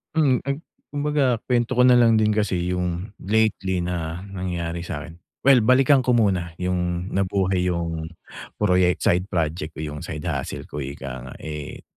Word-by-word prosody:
Hmm, 140 -5 +3
ag 140 +3 -1 0.3
kumbaga 145 -3 +1
kwento 120 0 0
ko 125 - +5
na 125 -1 +7
lang 115 -1 +5
din 110 0 +3
kasi 95 -4 0
'yung 90 +2 -2
lately 95 -3 +1
na 85 0 -3
nangyari 85 -3 -3
sa 75 -4 -5
akin. 85 0 -12 0.2
Well, 135 -2 +7
balikan 130 +4 +5
ko 125 -1 +3
muna 90 -7 +1
'yung 90 0 -1
nabuhay 95 -1 +1
'yung 85 -2 -2 0.5
proyek 90 -3 +2
side 90 +2 +2
project 80 -3 -2
ko - - -8
'yung 75 -1 -5
side 75 -1 -6
hustle - - -3
ko 75 - -6
ika 65 -2 -6
nga. - - -9
Eh, 75 -2 -6
90 Hz, 165 wpm, -23 LUFS, 85-110 Hz, 0.5 s, na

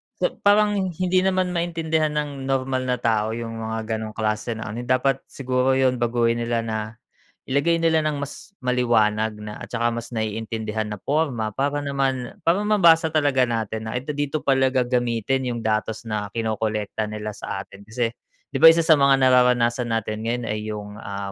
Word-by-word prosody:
sa - - +1
parang 210 +1 +4
hindi 185 0 0
naman 185 -1 +1
maintindihan 165 -2 0
ng 145 -3 -3
normal 130 -1 0
na 125 0 +1
tao 110 -2 +1
'yung 115 -1 -5
mga 110 0 -3
gano'ng 110 -1 -6
klase 110 +1 -1
na 110 - -6
ano, 115 +3 -5
dapat 130 +1 +1
siguro 130 0 0
'yun 130 -2 +2
baguhin 120 0 +1
nila 115 0 -1
na, 110 -1 -2 0.7
ilagay 165 +5 +2
nila 160 -1 +3
ng 150 -2 -1
mas 140 +8 -8
maliwanag 110 -4 +1
na 105 0 -7
at - - -10
saka 120 -1 0
mas 115 +1 -5
naiintindihan 110 0 -3
na 100 - -7
porma 135 -7 0
para 140 +2 0
naman 135 -3 -2
para 170 +4 +3
mabasa 170 -6 +4
talaga 145 -5 +2
natin 110 -1 -3
na 110 - -4
ito 135 +4 -4
dito 145 +1 -2
pala 135 -1 +3
gagamitin 125 0 0
'yung 120 -1 -4
datos 110 +1 -1
na 105 -2 -3
kinokolekta 110 -1 -2
nila 105 0 -5
sa 100 -1 -5
atin. 100 - -15
Kasi, 115 0 -1 0.4
'di - - -1
ba - - +11
isa 165 0 +4
sa 160 - +7
mga 140 0 +5
nararanasan 125 -1 +3
natin 110 -1 -2
ngayon 120 +1 -1
ay 105 0 -2
'yung, 105 0 -6
ah, 100 0 -5
125 Hz, 175 wpm, -23 LUFS, 110-140 Hz, 0.7 s, ba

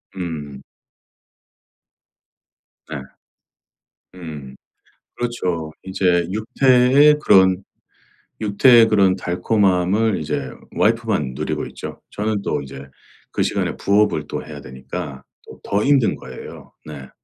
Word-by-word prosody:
음. 75 -7 -6 2.3
네. 75 - -5 1.2
음. 75 -7 -9 0.6
그렇죠. 90 -10 -3
이제 90 -2 +1
육퇴의 130 +6 +4
그런 95 0 +5 0.8
육퇴의 115 +3 +6
그런 100 -3 +3
달콤함을 95 +2 +1
이제 70 -3 -3 0.3
와이프만 110 - +1
누리고 - - -3
있죠. - - -9
저는 105 0 -2
또 75 -6 -2
이제 70 0 -10 0.4
그 - - 0
시간에 - - -1
부업을 100 -7 +1
또 - - -5
해야 75 -2 -9
되니까 65 +2 -7 0.2
또 - - -13
더 100 +1 0
힘든 135 -8 +3
거예요. 65 0 -11
네. 70 -4 -9
95 Hz, 205 characters per minute, -20 LUFS, 75-110 Hz, 2.3 s, 육퇴의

